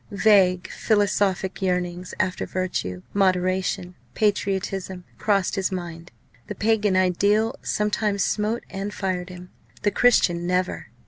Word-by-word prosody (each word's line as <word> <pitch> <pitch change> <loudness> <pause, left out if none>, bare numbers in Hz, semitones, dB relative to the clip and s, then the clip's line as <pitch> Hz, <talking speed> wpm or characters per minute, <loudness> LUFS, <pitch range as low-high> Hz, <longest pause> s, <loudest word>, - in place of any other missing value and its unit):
Vague 195 -3 +3
philosophic 200 -3 0
yearnings 180 -1 -2
after 185 0 -1
virtue, 90 - -3
moderation, 185 -1 +1 0.2
patriotism, 195 -3 -1 0.2
crossed 200 -3 +1
his 195 -1 -1
mind. 175 -2 -6 0.4
The - - -5
Pagan 210 -3 +2
ideal 200 +5 +2
sometimes 210 -1 0
smote 215 +2 -1
and 195 +2 -4
fired 185 -3 -3
him, 180 0 -11 0.3
the 205 - +2
Christian 175 -7 +3
never. 180 0 -1
190 Hz, 115 wpm, -24 LUFS, 180-205 Hz, 0.4 s, Vague